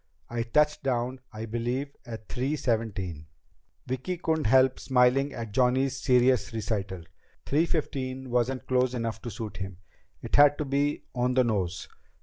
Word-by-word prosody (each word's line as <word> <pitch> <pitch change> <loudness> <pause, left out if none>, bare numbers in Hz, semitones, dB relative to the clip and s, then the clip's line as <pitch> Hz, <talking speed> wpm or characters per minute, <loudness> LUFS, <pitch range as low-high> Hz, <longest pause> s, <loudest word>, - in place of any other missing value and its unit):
I 120 -1 -1
touched 150 +6 +2
down, 130 -1 -1
I 110 +1 -6
believe, 120 +5 -3
at 110 -2 -8
three 135 +4 -1
seventeen." 100 - -2 0.6
Vicki 130 +8 -3
couldn't 160 -2 0
help 130 +2 +4
smiling 130 +2 +3
at 115 -4 -6
Johnny's 130 +3 +2
serious 125 -6 +3
recital. 100 -5 -3 0.4
Three 155 +4 +2
fifteen 130 -5 -3
wasn't 125 +2 0
close 130 0 +1
enough 115 -2 -3
to 120 - -5
suit 105 -4 -6
him! 95 -2 -6 0.5
It - - 0
had 145 0 +7
to 150 - -2
be 140 +2 0
on 125 0 0
the 130 - +5
nose. 95 -7 -1
125 Hz, 150 wpm, -28 LUFS, 115-135 Hz, 0.6 s, had